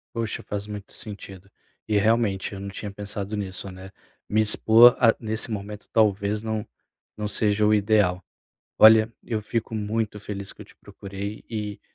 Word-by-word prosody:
Poxa, 115 Hz, -2 st, -3 dB
faz 105 Hz, 0 st, -5 dB
muito 105 Hz, -1 st, -9 dB
sentido. 100 Hz, -2 st, -10 dB, 0.4 s
E 105 Hz, -1 st, +1 dB
realmente, 105 Hz, -2 st, +1 dB
eu 100 Hz, -, -7 dB
não 100 Hz, 0 st, -6 dB
tinha 100 Hz, +1 st, -7 dB
pensado 100 Hz, +1 st, -5 dB
nisso, 95 Hz, -1 st, -5 dB
né, 95 Hz, +1 st, -11 dB, 0.4 s
me 110 Hz, -, +2 dB
expor 110 Hz, +3 st, +7 dB
a 115 Hz, -2 st, +5 dB
nesse 110 Hz, +1 st, -1 dB
momento 105 Hz, 0 st, -7 dB
talvez 105 Hz, -1 st, +1 dB
não 110 Hz, -1 st, -3 dB, 0.5 s
não 105 Hz, 0 st, -3 dB
seja 105 Hz, 0 st, +1 dB
o 105 Hz, -, +4 dB
ideal. 100 Hz, -4 st, +2 dB, 0.5 s
Olha, 110 Hz, +1 st, +7 dB
eu 110 Hz, -2 st, -2 dB
fico 115 Hz, +1 st, -3 dB
muito 105 Hz, 0 st, -2 dB
feliz 100 Hz, -1 st, -7 dB
que -, -, -14 dB
eu -, -, -10 dB
te -, -, -21 dB
procurei 100 Hz, +2 st, -8 dB
e 105 Hz, -2 st, -5 dB
105 Hz, 165 wpm, -24 LUFS, 100-110 Hz, 0.5 s, expor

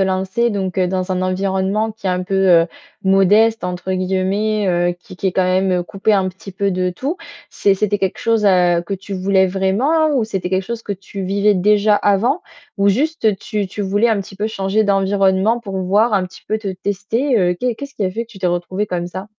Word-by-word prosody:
lancer 190 Hz, +5 st, 0 dB
donc 195 Hz, -3 st, -3 dB
heu, 185 Hz, -, +3 dB
dans 185 Hz, +1 st, -2 dB
un 185 Hz, 0 st, 0 dB
environnement 190 Hz, +3 st, 0 dB
qui 215 Hz, -2 st, -9 dB
est -, -, +2 dB
un 180 Hz, 0 st, -1 dB
peu, 195 Hz, +1 st, -4 dB
heu, 180 Hz, -3 st, +5 dB, 0.4 s
«modeste» 205 Hz, +4 st, +4 dB
entre 180 Hz, +1 st, -4 dB
guillemets, 190 Hz, +3 st, 0 dB
heu, 175 Hz, 0 st, +1 dB
qui 185 Hz, -, -13 dB
qui 190 Hz, -, 0 dB
est -, -, -3 dB
quand 185 Hz, -, +2 dB
même 185 Hz, 0 st, +1 dB
coupé 195 Hz, +4 st, -1 dB
un 190 Hz, -2 st, +2 dB
petit 190 Hz, +1 st, -11 dB
peu 200 Hz, +1 st, -1 dB
de 185 Hz, 0 st, 0 dB
tout? 270 Hz, -, -4 dB, 0.3 s
C'est 200 Hz, -, +2 dB
c'était 205 Hz, +1 st, 0 dB
quelque 190 Hz, -2 st, -2 dB
chose, 225 Hz, -2 st, +1 dB
heu, 180 Hz, -3 st, +3 dB
que -, -, -4 dB
tu 195 Hz, +1 st, -7 dB
voulais 190 Hz, 0 st, +2 dB
vraiment 205 Hz, -, +1 dB
ou 250 Hz, -5 st, +2 dB
c'était 195 Hz, -4 st, -4 dB
quelque 190 Hz, 0 st, +1 dB
chose 230 Hz, +2 st, -5 dB
que 205 Hz, -, -4 dB
tu 195 Hz, 0 st, -8 dB
vivais 200 Hz, +2 st, +2 dB
déjà 210 Hz, +2 st, +3 dB
avant, 220 Hz, -, +1 dB, 0.3 s
ou 200 Hz, 0 st, +3 dB
juste 235 Hz, -1 st, +1 dB
tu 210 Hz, -1 st, -3 dB
tu 195 Hz, +3 st, -7 dB
voulais 205 Hz, +4 st, +2 dB
un 220 Hz, -3 st, +1 dB
petit 195 Hz, 0 st, -10 dB
peu 210 Hz, +2 st, -1 dB
changer 210 Hz, 0 st, 0 dB
d'environnement 195 Hz, +2 st, +2 dB
pour 195 Hz, -5 st, -5 dB
voir 205 Hz, +5 st, +2 dB
un 195 Hz, -2 st, +2 dB
petit 180 Hz, -, -15 dB
peu 215 Hz, -, -1 dB
te 210 Hz, -2 st, -5 dB
tester? 205 Hz, +7 st, -1 dB
Heu 180 Hz, -2 st, +2 dB
qu'est 250 Hz, +2 st, -1 dB
qu'est-ce 280 Hz, +4 st, -9 dB
qui 205 Hz, -, -2 dB
a 185 Hz, -, 0 dB
fait 230 Hz, +5 st, -4 dB
que -, -, -22 dB
tu 210 Hz, -, -13 dB
t'es 185 Hz, -, -1 dB
retrouvé 175 Hz, +3 st, -1 dB
comme 175 Hz, -2 st, -3 dB
ça? 185 Hz, +3 st, -7 dB
195 Hz, 225 wpm, -18 LUFS, 185-215 Hz, 0.4 s, heu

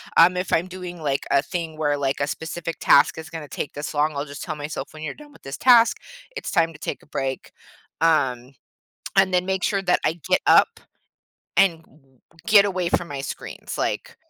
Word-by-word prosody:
um, 180 Hz, +2 st, +6 dB
if 180 Hz, -, -2 dB
I'm 165 Hz, +3 st, +2 dB
doing, 180 Hz, -2 st, -8 dB
like, 140 Hz, -2 st, -1 dB
a 140 Hz, -, +4 dB
thing 165 Hz, -2 st, -5 dB
where, 145 Hz, -2 st, 0 dB
like, 140 Hz, 0 st, -1 dB
a 140 Hz, -, 0 dB
specific 165 Hz, +1 st, -5 dB
task 145 Hz, +2 st, +5 dB
is 160 Hz, 0 st, -8 dB
gonna 160 Hz, -3 st, -7 dB
take 140 Hz, -, -5 dB
this 145 Hz, +1 st, -6 dB
long, 150 Hz, +1 st, +1 dB
I'll 140 Hz, +1 st, -2 dB
just 145 Hz, -1 st, -8 dB
tell 155 Hz, -3 st, -4 dB
myself, 150 Hz, +1 st, -6 dB
"When 155 Hz, -, -11 dB
you're 155 Hz, -, -5 dB
done 295 Hz, -1 st, -15 dB
with -, -, -19 dB
this 135 Hz, +1 st, -7 dB
task, 240 Hz, -2 st, +5 dB, 0.4 s
it's -, -, -5 dB
time 165 Hz, -3 st, +2 dB
to 145 Hz, -, -14 dB
take -, -, -5 dB
a -, -, -21 dB
break," 135 Hz, -2 st, -4 dB, 0.5 s
um, 135 Hz, -6 st, +1 dB, 0.6 s
and 190 Hz, -1 st, +4 dB
then 180 Hz, 0 st, +2 dB
make 190 Hz, -1 st, -1 dB
sure 195 Hz, -1 st, +1 dB
that 180 Hz, -, +1 dB
I -, -, +2 dB, 0.2 s
get -, -, +3 dB
up -, -, +4 dB, 0.8 s
and 165 Hz, -4 st, +3 dB
g -, -, -27 dB, 0.6 s
get 210 Hz, -2 st, +7 dB
away 185 Hz, -3 st, -1 dB
from 170 Hz, 0 st, 0 dB
my 140 Hz, -1 st, -5 dB
screens, 135 Hz, -, -7 dB
like 485 Hz, -1 st, -3 dB
160 Hz, 210 wpm, -23 LUFS, 145-180 Hz, 0.8 s, get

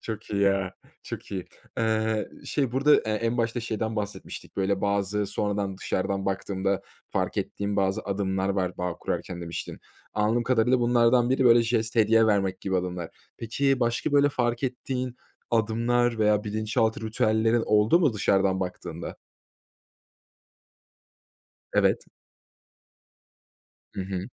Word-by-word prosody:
Çok 110 Hz, -2 st, -6 dB
iyi, 100 Hz, -1 st, 0 dB
ya, 95 Hz, -1 st, +2 dB, 0.3 s
çok -, -, -7 dB
iyi. 95 Hz, -2 st, -3 dB, 0.3 s
Eee, 110 Hz, -1 st, 0 dB, 0.2 s
şey, 135 Hz, -5 st, -1 dB
burada, 140 Hz, +3 st, +5 dB
eee, -, -, +1 dB
en 115 Hz, +3 st, 0 dB
başta 115 Hz, +1 st, 0 dB
şeyden 110 Hz, -1 st, -3 dB
bahsetmiştik. 105 Hz, -1 st, -6 dB
Böyle, 95 Hz, 0 st, 0 dB
bazı 100 Hz, +1 st, 0 dB
sonradan, 100 Hz, -1 st, -2 dB
dışarıdan 95 Hz, 0 st, -2 dB
baktığımda 95 Hz, 0 st, -1 dB, 0.3 s
fark -, -, -1 dB
ettiğim 100 Hz, 0 st, -2 dB
bazı 95 Hz, -1 st, +1 dB
adımlar 95 Hz, -1 st, -1 dB
var, 95 Hz, -2 st, -1 dB
bağ 90 Hz, -1 st, -2 dB
kurarken, 90 Hz, -2 st, -4 dB
demiştin. 85 Hz, -1 st, -6 dB, 0.3 s
Anladığım 110 Hz, +3 st, +2 dB
kadarıyla, 125 Hz, +1 st, +2 dB
bunlardan 120 Hz, 0 st, +4 dB
biri, 130 Hz, 0 st, +2 dB
böyle, 120 Hz, -1 st, +7 dB
jest, 115 Hz, 0 st, 0 dB
hediye 115 Hz, 0 st, +5 dB
vermek 95 Hz, -3 st, +1 dB
gibi 95 Hz, -1 st, -1 dB
adımlar. 90 Hz, -2 st, -3 dB, 0.3 s
Peki, 135 Hz, +4 st, 0 dB
başka, 120 Hz, +4 st, 0 dB
böyle, 145 Hz, 0 st, +5 dB
fark 120 Hz, -2 st, -1 dB
ettiğin 125 Hz, -1 st, -3 dB, 0.3 s
adımlar 115 Hz, +1 st, +1 dB
veya 105 Hz, -1 st, +3 dB
bilinçaltı 110 Hz, +2 st, 0 dB
ritüellerin 110 Hz, +1 st, +2 dB
oldu 105 Hz, +11 st, +4 dB
mu 145 Hz, -9 st, +3 dB
dışarıdan 95 Hz, -2 st, +2 dB
baktığında? 90 Hz, -1 st, -5 dB, 2.6 s
Evet. -, -, +2 dB, 1.9 s
Hı -, -, -2 dB
hı. 95 Hz, -1 st, -4 dB
110 Hz, 130 wpm, -26 LUFS, 100-120 Hz, 2.6 s, böyle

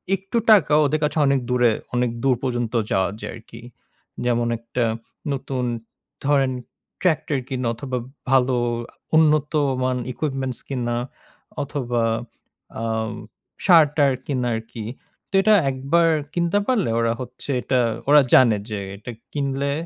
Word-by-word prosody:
একটু 195 Hz, +4 st, -4 dB
টাকা 185 Hz, -8 st, +5 dB
ওদের 155 Hz, +2 st, +1 dB
কাছে 150 Hz, +1 st, 0 dB
অনেক 135 Hz, 0 st, +3 dB
দূরে 125 Hz, -2 st, +4 dB, 0.2 s
অনেক 125 Hz, 0 st, +2 dB
দূর 130 Hz, -2 st, +4 dB
পর্যন্ত 120 Hz, -2 st, -1 dB, 0.2 s
যাওয়া 95 Hz, -1 st, +2 dB
যায় -, -, -5 dB
আরকি। 115 Hz, +1 st, -12 dB, 0.6 s
যেমন 120 Hz, -1 st, +1 dB
একটা 115 Hz, +2 st, -3 dB, 0.5 s
নতুন 130 Hz, -1 st, -3 dB, 0.6 s
ধরেন 135 Hz, -2 st, +3 dB, 0.5 s
ট্র্যাক্টর 155 Hz, -5 st, +1 dB
কিনা 130 Hz, -2 st, -2 dB
অথবা, 130 Hz, +2 st, -4 dB, 0.3 s
ভালো 130 Hz, -1 st, +4 dB, 0.4 s
আ -, -, -30 dB, 0.2 s
উন্নতমান 145 Hz, -4 st, +2 dB
equipments 135 Hz, -3 st, -3 dB
কিনা 120 Hz, -3 st, -1 dB, 0.7 s
অথবা, 125 Hz, -4 st, -2 dB, 0.8 s
আম 110 Hz, -1 st, -1 dB, 0.5 s
সার-টার 150 Hz, -5 st, +5 dB
কিনা 130 Hz, -4 st, -1 dB
আরকি। 110 Hz, -1 st, -7 dB, 0.4 s
তো -, -, -25 dB
এটা 215 Hz, +1 st, +5 dB, 0.2 s
একবার 140 Hz, +6 st, +2 dB, 0.2 s
কিনতে 175 Hz, +3 st, +1 dB
পারলে 230 Hz, -, +1 dB
ওরা 115 Hz, 0 st, +2 dB
হচ্ছে 130 Hz, +2 st, -9 dB
এটা 130 Hz, -2 st, +1 dB, 0.3 s
ওরা 150 Hz, 0 st, +8 dB
জানে 120 Hz, -5 st, +6 dB
যে, 105 Hz, -2 st, -3 dB, 0.2 s
এটা 115 Hz, +4 st, -8 dB, 0.2 s
কিনলে 140 Hz, -1 st, -1 dB
130 Hz, 125 wpm, -22 LUFS, 120-150 Hz, 0.8 s, ওরা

